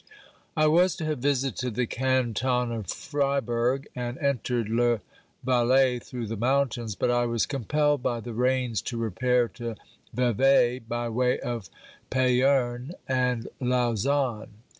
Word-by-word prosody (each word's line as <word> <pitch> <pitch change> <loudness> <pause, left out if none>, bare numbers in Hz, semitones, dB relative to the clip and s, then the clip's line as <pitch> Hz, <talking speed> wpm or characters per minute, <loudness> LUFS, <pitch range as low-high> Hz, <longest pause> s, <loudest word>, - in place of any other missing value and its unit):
I 155 - +4
was 170 +3 +4
to 160 - -4
have 155 -3 -2
visited 130 -3 -1
the 125 - +1
canton 125 -1 0
of 110 -5 -4
Friburg 135 - -1
and 120 0 -4
entered 125 -4 -1
le 120 +1 +2 0.4
Valais 125 0 +3
through 120 0 -6
the 110 +1 -4
mountains, 120 -2 0
but 120 - +1
I 120 0 +2
was 115 -4 +1
compelled 145 +2 0
by 120 -1 -1
the 120 +1 -7
rains 125 -1 0
to 120 - -5
repair 120 +3 +1
to 115 -1 -6 0.4
Vevey, 125 +1 +3
by 120 0 -4
way 125 +2 +1
of 115 -7 -4 0.4
Payerne 130 +1 +2
and 125 -2 0
Lausanne. 125 -1 0
125 Hz, 135 wpm, -26 LUFS, 120-130 Hz, 0.4 s, I